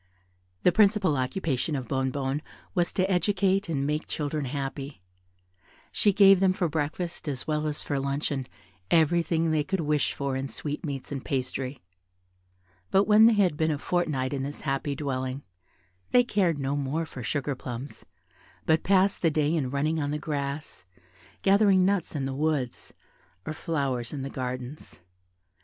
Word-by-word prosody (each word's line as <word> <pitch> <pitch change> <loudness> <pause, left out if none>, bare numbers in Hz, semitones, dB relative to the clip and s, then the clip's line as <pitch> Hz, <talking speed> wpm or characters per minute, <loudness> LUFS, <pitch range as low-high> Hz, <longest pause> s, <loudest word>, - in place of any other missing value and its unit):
The 180 - +6
principal 200 -4 +4
occupation 135 +2 -1
of 130 -3 -4
Bonnebonne 135 +2 -1 0.3
was 175 -3 +1
to 185 0 +1
educate 195 +1 +1
and 140 -4 0
make 150 +2 -1
children 150 -1 -2
happy: 135 -3 -5 0.9
she 205 - +3
gave 195 -1 +7
them 190 -1 +4
for 185 -3 0
breakfast 160 +3 -3
as 135 -3 -3
well 155 0 0
as 150 -1 -3
for 140 -2 -1
luncheon 140 -1 -2 0.4
everything 165 +1 +3
they 155 -1 +2
could 190 +3 -1
wish 150 -1 +1
for 140 -1 -2
in 135 +1 -2
sweetmeats 145 -1 -5
and 140 -2 -4
pastry; 130 -2 -3 1.1
but 195 - +4
when 215 +1 +7
they 230 - +5
had 195 -7 +3
been 160 +1 +1
a 150 - 0
fortnight 150 -5 -1
in 135 - -2
this 140 +2 -5
happy 140 0 -1
dwelling, 130 -1 -3 0.7
they 245 - +5
cared 190 -9 +1
no 140 0 -1
more 145 +3 -1
for 130 -4 -9
sugar 140 +5 -1
plums, 125 +1 -7 0.6
but 160 0 +3
passed 195 +1 +3
the 165 - +4
day 150 0 +1
in 140 -6 0
running 155 +4 0
on 145 - -1
the 150 - -1
grass, 145 -5 -4 0.6
gathering 195 -1 +5
nuts 195 -4 0
in 140 -2 -1
the 135 - -3
woods, 145 -3 -2 0.5
or 155 - -3
flowers 140 -8 -2
in 140 -2 -4
the 135 - -5
gardens. 130 0 -6
150 Hz, 160 wpm, -27 LUFS, 135-175 Hz, 1.1 s, gave